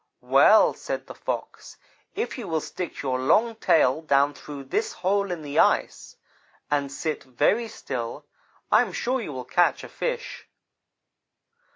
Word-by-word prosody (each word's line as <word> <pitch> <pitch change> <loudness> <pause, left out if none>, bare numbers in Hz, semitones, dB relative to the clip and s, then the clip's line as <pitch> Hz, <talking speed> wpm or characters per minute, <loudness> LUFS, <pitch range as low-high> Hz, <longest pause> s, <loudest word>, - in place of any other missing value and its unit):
"'Well,' - - +5
said - - -5
the - - -9
Fox, - - -6 0.4
'if 445 +4 -3
you 240 -6 -7
will 160 -2 0
stick 175 +2 -6
your 130 -2 -1
long 220 - +3
tail 155 - +3
down 140 -2 +2
through 140 0 -9
this 135 - -2
hole 200 +2 0
in 170 -3 -4
the 145 0 -1
ice, - - +1 0.6
and 140 -2 0
sit 155 +2 -3
very 200 - +1
still, 130 - -6 0.5
I 215 - +6
am 220 -7 -3
sure 255 +6 -1
you 200 - -6
will 130 -2 -6
catch 175 +6 +2
a - - -9
fish.' - - -4
160 Hz, 155 wpm, -25 LUFS, 140-210 Hz, 0.6 s, I